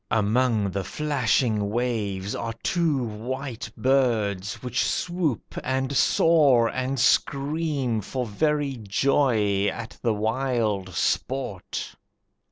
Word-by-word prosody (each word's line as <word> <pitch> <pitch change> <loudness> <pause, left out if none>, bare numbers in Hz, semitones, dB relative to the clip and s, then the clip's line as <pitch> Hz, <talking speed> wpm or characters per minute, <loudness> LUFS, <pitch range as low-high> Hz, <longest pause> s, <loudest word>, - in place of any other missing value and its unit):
Among 110 -1 +2
the 100 +1 -2
flashing 125 -7 0
waves 105 -4 -2
are 115 -1 -4
two 160 -7 +1
white 120 +3 -5
birds 110 -6 +1
Which 125 0 0
swoop, 175 - -2
and 130 +1 -1
soar, 140 -7 +4
and 130 +1 -2
scream 140 -2 +1
for 125 +5 -3
very 145 +4 0
joy 105 -2 +1
At 110 +1 -5
the 115 -3 +1
wild 110 -4 -1
sport. 120 -1 -2
120 Hz, 100 wpm, -25 LUFS, 105-135 Hz, -, soar